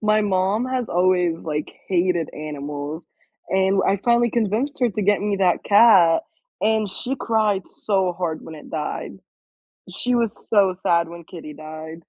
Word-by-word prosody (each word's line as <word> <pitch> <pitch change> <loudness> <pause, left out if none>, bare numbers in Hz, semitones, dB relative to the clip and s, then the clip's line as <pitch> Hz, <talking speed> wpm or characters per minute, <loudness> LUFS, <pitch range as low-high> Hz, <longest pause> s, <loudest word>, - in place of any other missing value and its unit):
my 215 0 +3
mom 200 +3 +1
has 255 -2 -2
always, 180 -2 +1
like, 150 -2 -3 0.2
hated 175 -3 +1
animals 150 +1 -6 0.4
and 190 +1 +2
I 195 - +3
finally 235 0 +3
convinced 235 +6 -1
her 245 -2 +3
to 210 - -3
get 205 0 +2
me 205 -1 0
that 185 -2 +1
cat, 200 -6 +6 0.4
and 220 0 +2
she 250 +7 -3
cried 215 -4 0
so 190 -3 -1
hard 170 -2 -3
when 160 - -9
it 150 - -12
died. 150 -2 -4 0.8
She 245 0 -1
was 230 -2 0
so 200 -4 +4
sad 170 -2 +1
when 170 0 -10
Kitty 155 -3 -10
died. 155 +1 -9
190 Hz, 160 wpm, -22 LUFS, 165-215 Hz, 0.8 s, cat